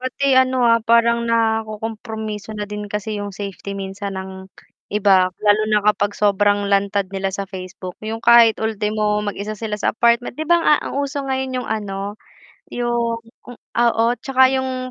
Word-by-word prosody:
Pati 260 +2 0
ano 260 -1 +3
ah, 230 -1 +4
parang 235 +1 +3
nakukumpromiso 220 -1 -2
na 210 - -4
din 210 0 -7
kasi 210 +1 -3
yung 205 - -5
safety 200 0 -7
minsan 195 0 -5
ng 190 0 -9 0.4
iba, 195 -3 +4
lalo 210 0 +3
na 210 - +3
kapag 205 -1 +2
sobrang 205 0 +2
lantad 200 0 +1
nila 195 0 -1
sa 195 0 -4
Facebook. 185 -1 -8
Yung 225 +1 -4
kahit 235 -1 +6
ultimo 210 -1 0
mag-isa 205 +1 -4
sila 215 0 -4
sa - - +1
apartment, 235 +2 +2
'di 315 - -3
ba? 345 - +6
A 300 - +5 0.2
ang - - -7
uso 280 0 -2
ngayon 265 -1 -2
yung - - -9
ano, 205 -1 -4 0.5
yung 235 -1 -1 0.6
oo 235 -1 +3 0.2
'tsaka 260 -1 +4
yung 255 -1 -3
215 Hz, 160 wpm, -20 LUFS, 200-235 Hz, 0.6 s, kahit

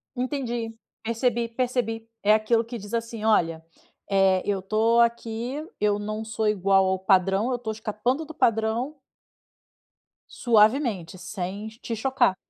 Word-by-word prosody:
Entendi. 245 -3 -3 0.3
Percebi, 235 +1 0
percebi. 230 -2 -2 0.2
É 210 - +6
aquilo 220 +1 +2
que 235 +1 -6
diz 205 +1 -10
assim: 230 -1 -3
"Olha, 165 -7 +2 0.5
eh, 195 -1 +3
eu 200 -1 0
estou 220 +4 +2
aqui, 235 +4 -1 0.2
eu 210 -1 +2
não 215 +1 -4
sou 220 -1 -1
igual 195 -1 +3
ao 190 0 0
padrão, 195 +4 +2
eu 255 - 0
estou 235 -2 -4
escapando 220 +7 -2
do 315 - -10
padrão" 230 +3 +1 1.4
"suavemente, 215 - +2
sem 190 +2 -5
te 230 - -3
chocar". 245 -3 +2
220 Hz, 135 wpm, -25 LUFS, 205-235 Hz, 1.4 s, É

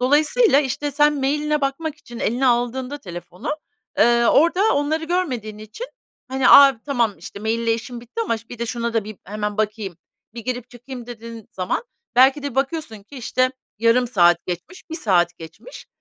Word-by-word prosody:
Dolayısıyla, 295 - +4
işte, 290 +1 -2
sen 295 +1 +3
mail'ine 300 +2 0
bakmak 280 +3 -2
için 240 -5 -11
eline 245 +5 0
aldığında 250 +3 0
telefonu, 180 - -6 0.4
eee, 235 0 +5
orada 360 - +4
onları 300 +3 0
görmediğin 260 - -2
için, 215 - -8 0.4
hani, 265 0 +2
"A, 275 -4 +8
tamam, 240 -7 +1 0.3
mail 220 +2 0
ile 230 -1 +2
işim 235 +1 -7
bitti 245 - -7
ama 230 - 0
ş 225 - -20
bir 245 - -9
de 235 - -2
şuna 235 0 -3
da 225 -3 +1
bir 215 0 -8
hemen 210 +1 -3
bakayım, 210 -4 -2 0.4
bir 235 - -6
girip 250 -1 -4
çıkayım." 245 0 -9
dediğin 230 -2 -9
zaman 185 - -2 0.3
belki 265 +3 +5
de 285 -3 -4
bakıyorsun 270 -5 -2
ki, 275 +8 -14
işte, 255 +1 +1 0.3
yarım 230 +2 +3
saat 175 -6 +3
geçmiş, 250 - -7
1 - - -4
saat 180 - +1
geçmiş. 165 - -11
245 Hz, 170 wpm, -22 LUFS, 220-285 Hz, 0.4 s, A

